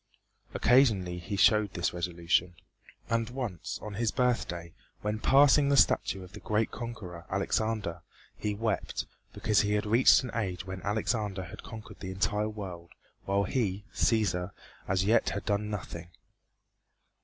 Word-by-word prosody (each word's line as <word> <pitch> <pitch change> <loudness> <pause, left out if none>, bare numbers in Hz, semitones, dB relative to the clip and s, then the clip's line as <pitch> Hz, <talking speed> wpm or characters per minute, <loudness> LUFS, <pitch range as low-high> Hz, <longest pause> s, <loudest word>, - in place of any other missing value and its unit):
Occasionally 105 -9 +3
he 90 +4 -4
showed 105 +1 +4
this 85 - 0
resolution. 85 0 0 0.5
And 115 0 0
once 120 -8 -4
on 105 - -6
his 115 +2 0
birthday, 85 -9 -1 0.3
when 105 +1 -2
passing 140 +3 +5
the 140 - +3
statue 95 -6 +3
of 90 - -13
the - - -8
great 110 +1 0
conqueror, 100 -8 -7
Alexander, 100 -2 -1 0.3
he 105 -1 -2
wept 110 -1 -2 0.3
because 105 -2 +2
he 105 0 0
had 105 0 0
reached 115 +5 +6
an 125 - -5
age 95 -5 -2
when 95 -1 -6
Alexander 105 -2 -1
had 85 - -9
conquered 110 -2 -10
the 95 - -6
entire 105 +2 0
world, 90 -5 -8 0.3
while 100 +1 +1
he, 100 -2 -1
Cæsar, 95 -6 +1 0.4
as 95 0 +1
yet 115 +3 +3
had 100 - -4
done 105 0 0
nothing. 85 -4 -6
105 Hz, 145 wpm, -29 LUFS, 90-110 Hz, 0.5 s, reached